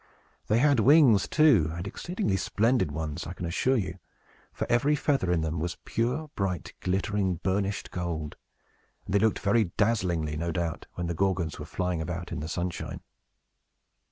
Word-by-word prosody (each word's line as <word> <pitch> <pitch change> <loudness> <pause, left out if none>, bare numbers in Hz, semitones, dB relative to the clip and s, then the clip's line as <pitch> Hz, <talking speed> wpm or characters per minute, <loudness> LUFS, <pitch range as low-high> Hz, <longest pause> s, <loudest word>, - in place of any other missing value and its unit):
They 110 - +3
had 140 0 +4
wings, 130 -4 +6
too, 125 - +4
and 85 - -5
exceedingly 170 - -2
splendid 110 - +1
ones, 75 0 -4
I 85 - -5
can 90 - -6
assure 125 +10 +1
you; 95 -3 -3 0.5
for - - -3
every 135 +5 +3
feather 135 - +1
in 85 -2 +2
them 80 0 -2
was 85 +2 -3
pure, 130 +7 -1
bright, 95 -4 -3
glittering, 95 0 0
burnished 100 0 -1
gold, 85 -4 -4 0.7
and 95 - -5
they 100 - +5
looked 110 0 +2
very 105 +2 +2
dazzlingly, 90 -9 +1
no 85 +1 -2
doubt, 85 0 -3
when 90 - -3
the 85 - -2
Gorgons 90 -2 -1
were - - -6
flying 90 -3 -2
about 85 +1 -5
in 85 - -3
the 75 - -4
sunshine. 85 +1 -4
95 Hz, 165 wpm, -28 LUFS, 85-115 Hz, 0.7 s, wings